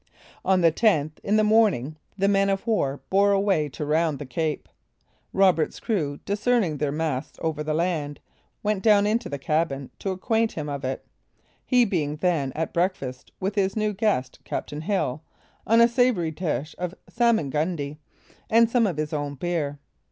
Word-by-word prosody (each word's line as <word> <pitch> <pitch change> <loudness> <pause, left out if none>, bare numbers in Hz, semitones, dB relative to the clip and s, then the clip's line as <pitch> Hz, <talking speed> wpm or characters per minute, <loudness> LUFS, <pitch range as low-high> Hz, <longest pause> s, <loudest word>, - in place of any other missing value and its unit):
On 190 -1 +3
the 165 -1 +5
10th, 155 -6 +1
in 205 - +1
the 215 - +4
morning, 210 - +3 0.2
the 195 0 +2
man 195 0 +3
of 195 +2 -1
war 145 - 0
bore 200 +1 +4
away 195 -7 +2
to 150 +2 -5
round 155 0 +1
the 145 - -7
cape. 155 +4 -2 0.6
Roberts' 185 -5 +2
crew, 155 - -1
discerning 205 -5 +1
their 145 -1 -1
masts 150 -3 -3
over 160 -2 -1
the 155 0 -1
land, 155 -4 -1 0.4
went 210 -2 0
down 205 -2 +5
into 220 +3 0
the 140 - -3
cabin 140 -1 -1
to 195 - -3
acquaint 225 +4 0
him 150 -2 -4
of 140 -1 -4
it, 130 0 -3 0.6
he 250 -2 +4
being 155 -8 -1
then 155 -5 0
at 160 +1 -3
breakfast 170 -8 -2
with 195 +2 -1
his 195 -2 0
new 215 -1 0
guest, 195 - -1
captain 150 +1 -4
Hill, 160 -6 -1 0.5
on 230 +2 +5
a 235 - +8
savoury 235 -9 +2
dish 155 -2 -3
of 180 0 -3
salmagundy 155 - 0 0.5
and 230 +1 +5
some 235 -3 +3
of 175 -6 -3
his 155 0 -2
own 145 -1 -2
beer. 150 -2 -2
170 Hz, 170 wpm, -25 LUFS, 150-205 Hz, 0.6 s, a